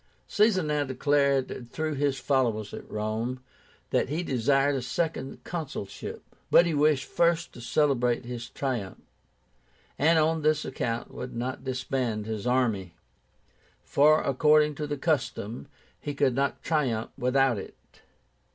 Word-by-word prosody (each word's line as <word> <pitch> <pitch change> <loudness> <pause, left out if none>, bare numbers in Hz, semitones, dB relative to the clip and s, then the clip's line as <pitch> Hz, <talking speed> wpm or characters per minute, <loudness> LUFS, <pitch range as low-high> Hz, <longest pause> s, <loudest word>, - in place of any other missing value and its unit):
Caesar 210 -3 +3
now 150 -1 0
declared 135 -2 0
through 155 -1 -2
his 140 -1 0
followers 120 -8 0
at - - -8
Rome 110 +4 -2 0.5
that - - +1
he 160 +5 -1
desired 135 +1 +2
a 135 - -1
second 135 0 -3
consulship. 150 - -6 0.3
But 175 - +7
he 170 - 0
wished 150 -1 +3
first 170 0 +1
to 120 - -11
celebrate 125 -2 +1
his 120 -1 -6
triumph, 120 -9 -3 1.0
and 160 +3 +4
on 160 +1 +2
this 155 0 +2
account 115 0 -3
would 125 -1 -6
not 125 +2 -4
disband 125 -4 -2
his 110 0 -4
army; 110 -9 0 0.9
for, 155 +2 +4
according 150 +2 +4
to 150 - -2
the 145 0 -3
custom, 135 -7 -2 0.3
he 145 -1 -5
could 140 -2 +2
not 140 +2 -1
triumph 130 -9 0
without 125 -2 +2
it. - - -9
135 Hz, 135 wpm, -27 LUFS, 120-150 Hz, 1.0 s, But